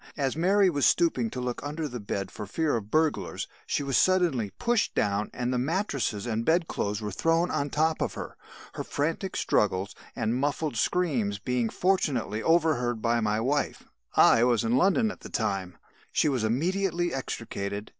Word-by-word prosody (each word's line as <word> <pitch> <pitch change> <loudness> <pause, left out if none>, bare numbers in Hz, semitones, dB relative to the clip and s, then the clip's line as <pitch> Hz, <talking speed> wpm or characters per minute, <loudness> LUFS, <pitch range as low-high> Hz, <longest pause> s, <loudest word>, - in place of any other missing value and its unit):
As 135 -2 0
Mary 190 +4 +4
was 145 -6 +3
stooping 145 -9 +2
to 125 - -6
look 125 0 -3
under 150 +2 -3
the 125 -3 -6
bed 100 -2 -4
for 105 - -7
fear 155 +7 0
of 105 -3 -4
burglars, 155 +4 0 0.2
she - - 0
was 135 -2 -1
suddenly 175 - +2
pushed 240 - 0
down 100 0 0
and 125 0 -2
the 125 - +1
mattresses 140 - -1
and 115 -1 -1
bedclothes 115 - 0
were 105 - -3
thrown 165 - +1
on 140 - 0
the - - -8
top 160 +1 +1
of - - -1
her. - - -7 0.4
Her - - -4
frantic 165 +6 -2
struggles 100 -1 +1 0.2
and 110 +1 0
muffled 145 +2 -1
screams 120 - 0
being, 120 +2 -1
fortunately, 140 - 0
overheard 155 -8 +2
by 115 +1 +1
my 105 -1 0
wife 140 +5 -1 0.3
(I 115 - +6
was 120 -3 +3
in 115 +2 +1
London 200 - +3
at - - -11
the - - -10
time), 95 -6 -2 0.3
she - - +2
was 130 -6 0
immediately 175 - 0
extricated. 105 -5 -4
130 Hz, 175 wpm, -27 LUFS, 110-165 Hz, 0.4 s, I